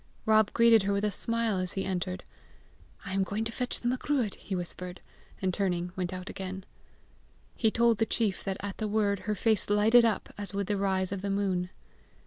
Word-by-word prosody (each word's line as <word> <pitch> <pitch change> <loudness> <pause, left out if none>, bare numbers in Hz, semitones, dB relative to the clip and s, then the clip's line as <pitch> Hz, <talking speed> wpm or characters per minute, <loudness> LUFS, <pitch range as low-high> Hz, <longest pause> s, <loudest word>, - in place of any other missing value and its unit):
Rob 215 -1 +4
greeted 230 -1 +6
her 200 +1 0
with 200 +1 0
a 210 - +1
smile 230 -1 +2
as 185 -1 -2
he 195 - -2
entered. 185 -1 -3 0.8
"I 195 - -5
am 195 - +1
going 205 +3 -2
to 225 - -3
fetch 250 +2 -3
the 240 - -3
Macruadh," 255 -3 0
he 195 - -6
whispered, 180 0 -5 0.4
and 185 -1 +1
turning 180 -2 -1
went 180 -1 -2
out 185 0 -6
again. 190 0 -6 0.9
He 220 - +2
told 230 0 +3
the 225 - +3
chief 210 -4 -1
that 195 -1 -2
at 200 0 -6
the 215 - -1
word 205 -2 +1
her 210 - +1
face 215 +1 +1
lighted 215 +4 +6
up 225 -2 0
as 200 -1 -5
with 200 0 0
the 205 - -1
rise 190 -1 0
of 200 -2 -3
the 200 - -3
moon. 190 -3 0
200 Hz, 205 wpm, -29 LUFS, 190-220 Hz, 0.9 s, greeted